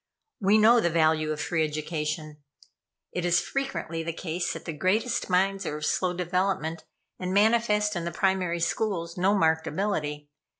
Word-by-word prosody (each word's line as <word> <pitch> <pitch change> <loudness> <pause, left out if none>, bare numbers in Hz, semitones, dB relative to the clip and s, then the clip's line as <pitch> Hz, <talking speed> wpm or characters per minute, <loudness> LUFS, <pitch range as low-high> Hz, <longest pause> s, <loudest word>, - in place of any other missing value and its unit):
We 200 +1 +4
know 225 +3 +6
the 175 - +2
value 155 -1 +2
of 150 - -3
free 160 0 0
education. 155 0 -4 0.7
It 180 - -3
is 175 0 +3
frequently 270 -12 -3
the 165 +1 -3
case 170 +1 -3
that - - -9
the 165 - -4
greatest 195 +11 0
minds 195 +2 +2
are 150 - -3
of 150 - -4
slow 185 +3 +1
development, 175 -3 -1 0.3
and 185 0 -3
manifest 210 -1 +3
in 175 - -2
the 170 - -3
primary 180 -1 0
schools 170 -3 -1
no 190 +3 +2
marked 160 -3 +2
ability. 150 -7 -2
175 Hz, 165 wpm, -27 LUFS, 160-195 Hz, 0.7 s, know